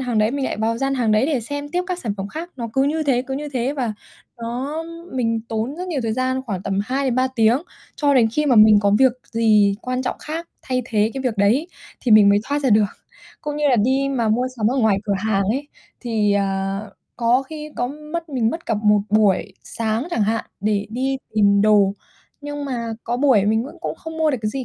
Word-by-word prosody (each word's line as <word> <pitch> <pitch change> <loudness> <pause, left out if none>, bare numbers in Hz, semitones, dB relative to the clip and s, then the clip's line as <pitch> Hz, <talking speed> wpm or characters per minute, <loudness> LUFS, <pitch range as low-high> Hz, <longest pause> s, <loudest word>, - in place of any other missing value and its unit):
hàng 245 -4 -1
đấy, 215 +2 +3
mình 275 0 -2
lại - - -2
vào 225 +2 -1
gian 270 0 0
hàng 230 -4 +1
đấy 215 +6 +3
để 285 -6 0
xem 285 +5 -5
tiếp 360 +3 0
các 365 -1 -3
sản 210 -4 -3
phẩm 195 +1 -5
khác. 335 +7 -7
Nó 235 -2 -4
cứ 270 - +2
như 310 +3 0
thế, 265 -4 +1
cứ 265 +1 -5
như 295 +2 -4
thế, 260 0 -1
và 250 -7 -2 0.5
nó 255 +7 -4 0.3
mình 230 -3 0
tốn 225 +7 -3
rất 365 +1 -5
nhiều 310 -6 -1
thời 225 -1 -1
gian, 260 +2 -1
khoảng 190 -4 -3
tầm 195 0 -2
2-3 260 +1 0
tiếng, 230 +3 +4 0.4
cho 285 -1 +2
đến 235 -4 +5
khi 300 +4 0
mà 255 -4 +4
mình 215 -1 +8
có 200 0 +2
việc 260 -2 +5 0.2
gì 215 -3 +4
quan 255 +1 -2
trọng 250 - -2
khác 325 +2 -6
thay 255 -1 -1
thế 220 -3 +1
cái 270 - -4
việc 240 -4 -1
đấy 235 - +2 0.3
thì 240 - +2
mình 210 -1 +8
mới 200 0 +5
thoát 285 +1 -1
ra 265 - +2
được. 210 -1 +5 0.5
Cũng 295 -1 -4
như 295 -1 +2
là 250 - +4
đi 265 +5 +2
mà 240 -5 0
mua 240 +4 +1
sắm 215 -3 0
ở 265 - -1
ngoài 220 -5 +3
cửa 200 - 0
hàng 205 -1 +1
ấy, 270 +8 -2 0.3
thì, 220 -4 +1
à, 195 -1 -1 0.4
có 240 +2 +2
khi 305 +2 -8
có 245 - 0
mất 305 +4 -6
mình 245 -6 0
mất 335 - -6
cả 225 - +1
một 210 -1 +4
buổi 210 -3 +2
sáng 225 +6 -2
chẳng 225 - +1
hạn, 225 +2 0 0.2
để 205 0 0
đi 265 +3 -1 0.2
tìm 200 -1 +4
đồ, 205 -2 +4 0.5
nhưng 290 0 -5
mà 235 -4 -3
có 240 - -1
buổi 255 -7 +4
mình 220 +2 +2
vẫn 285 - -10
cũng - - -3
không 320 -1 -9
mua 315 -1 +3
được 260 - -1
cái 215 - 0
gì 265 +1 -4
245 Hz, 240 wpm, -21 LUFS, 215-275 Hz, 0.5 s, mình